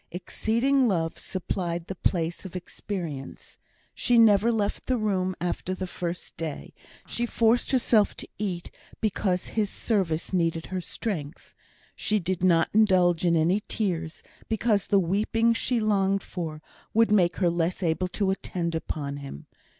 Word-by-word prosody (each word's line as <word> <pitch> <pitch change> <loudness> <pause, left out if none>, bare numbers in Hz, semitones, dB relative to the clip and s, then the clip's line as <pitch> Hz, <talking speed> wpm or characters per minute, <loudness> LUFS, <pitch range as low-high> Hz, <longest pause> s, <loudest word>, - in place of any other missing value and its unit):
Exceeding 235 +9 +1
love 165 -6 -1
supplied 175 -2 -3
the 190 - -5
place 170 -2 -1
of 190 -2 -9
experience. 175 -6 -6 0.3
She 245 - +2
never 225 0 +6
left 210 -3 -1
the 255 - +2
room 190 -4 0
after 180 +1 -2
the 185 - -4
first 175 -1 -5
day; 160 -3 -5 0.3
she 240 0 -2
forced 230 +1 +2
herself 230 -5 +3
to - - -8
eat, 185 -5 -3 0.3
because 190 -4 0
his 215 -3 0
service 190 -8 -1
needed 165 -2 +1
her 185 -1 -3
strength. 170 -6 -5 0.4
She 215 - +1
did 185 -2 -2
not 170 -3 +4
indulge 185 -6 +4
in 170 -1 +3
any 170 +6 +3
tears, 170 -7 -2 0.3
because 220 -2 +1
the 200 - +4
weeping 215 +6 +2
she 235 +1 0
longed 195 -2 +2
for 155 -4 -6 0.3
would 225 -1 +4
make 180 -4 +4
her 175 -3 +2
less 170 +2 -1
able 170 +2 +1
to 190 +1 0
attend 175 -3 -3
upon 145 -3 -3
him. 140 - -8
185 Hz, 150 wpm, -27 LUFS, 170-215 Hz, 0.4 s, never